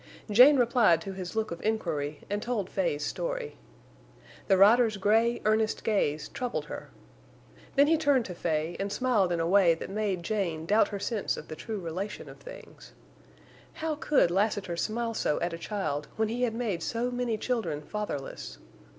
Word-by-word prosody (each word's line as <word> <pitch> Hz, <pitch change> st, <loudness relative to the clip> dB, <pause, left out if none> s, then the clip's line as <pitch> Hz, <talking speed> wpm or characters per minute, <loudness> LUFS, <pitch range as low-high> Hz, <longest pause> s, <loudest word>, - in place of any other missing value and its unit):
Jane 255 Hz, +7 st, +8 dB
replied 235 Hz, -8 st, +4 dB
to 195 Hz, +3 st, -6 dB
his 185 Hz, +1 st, -6 dB
look 220 Hz, -3 st, -1 dB
of 170 Hz, -, -6 dB
inquiry 160 Hz, -9 st, -2 dB
and 205 Hz, +1 st, -2 dB
told 215 Hz, -6 st, -2 dB
Fay's 150 Hz, -6 st, -1 dB
story. -, -, -3 dB, 0.9 s
The 195 Hz, -, +4 dB
rider's 220 Hz, +2 st, +5 dB
gray, 225 Hz, +4 st, +2 dB
earnest 215 Hz, 0 st, +1 dB
gaze 155 Hz, -8 st, 0 dB
troubled 250 Hz, -2 st, -3 dB
her. -, -, -8 dB, 0.9 s
Then 280 Hz, 0 st, +6 dB
he 320 Hz, +2 st, +3 dB
turned 285 Hz, -6 st, +2 dB
to 180 Hz, -, -6 dB
Fay 165 Hz, -1 st, -2 dB
and 200 Hz, +1 st, -2 dB
smiled 215 Hz, -7 st, +1 dB
in 170 Hz, -, 0 dB
a 165 Hz, -, +1 dB
way 175 Hz, -2 st, +5 dB
that 165 Hz, -, -7 dB
made 200 Hz, -4 st, -1 dB
Jane 170 Hz, -6 st, -2 dB
doubt 210 Hz, +5 st, +4 dB
her 205 Hz, -, -5 dB
sense 210 Hz, +1 st, -2 dB
of 155 Hz, -, -9 dB
the 155 Hz, -, -5 dB
true 220 Hz, +5 st, -5 dB
relation 185 Hz, +4 st, -5 dB
of -, -, -13 dB
things. -, -, -12 dB, 0.8 s
How 320 Hz, 0 st, -2 dB
could 290 Hz, -, +2 dB
Lassiter 195 Hz, -2 st, 0 dB
smile 230 Hz, +5 st, -2 dB
so 150 Hz, -, 0 dB
at 175 Hz, 0 st, -2 dB
a -, -, -4 dB
child 160 Hz, -8 st, -3 dB
when 220 Hz, -1 st, 0 dB
he 240 Hz, +2 st, -3 dB
had 235 Hz, -3 st, 0 dB
made 220 Hz, -8 st, -2 dB
so 240 Hz, +2 st, -2 dB
many 245 Hz, -2 st, -1 dB
children 215 Hz, -11 st, -2 dB
fatherless? 145 Hz, -, -5 dB
210 Hz, 175 wpm, -28 LUFS, 175-235 Hz, 0.9 s, Jane